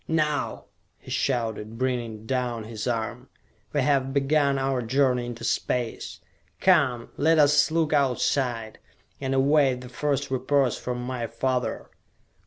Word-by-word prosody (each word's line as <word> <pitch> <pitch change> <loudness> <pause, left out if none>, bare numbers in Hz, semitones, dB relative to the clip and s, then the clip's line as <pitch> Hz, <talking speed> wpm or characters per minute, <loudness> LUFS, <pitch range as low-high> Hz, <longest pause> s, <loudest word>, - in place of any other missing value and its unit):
"Now!" 150 -2 -1 0.3
he - - -12
shouted, 115 -4 -1
bringing 120 -4 -2
down 125 -2 -2
his 110 0 -6
arm. 120 +2 -3 0.4
"We 145 - +1
have 135 0 +1
begun 140 0 +2
our 135 -1 0
journey 125 0 +1
into 120 -1 -7
space! 120 -2 -2 0.4
Come, 140 -11 +3
let 160 +2 +3
us 145 0 +5
look 160 -1 +1
Outside, 125 -4 0 0.4
and 135 -1 -1
await 135 -2 +3
the 125 - -9
first 140 +1 -2
reports 130 -1 +1
from 125 0 -4
my 125 -2 -3
father!" 130 +1 -2
130 Hz, 130 wpm, -26 LUFS, 120-140 Hz, 0.4 s, us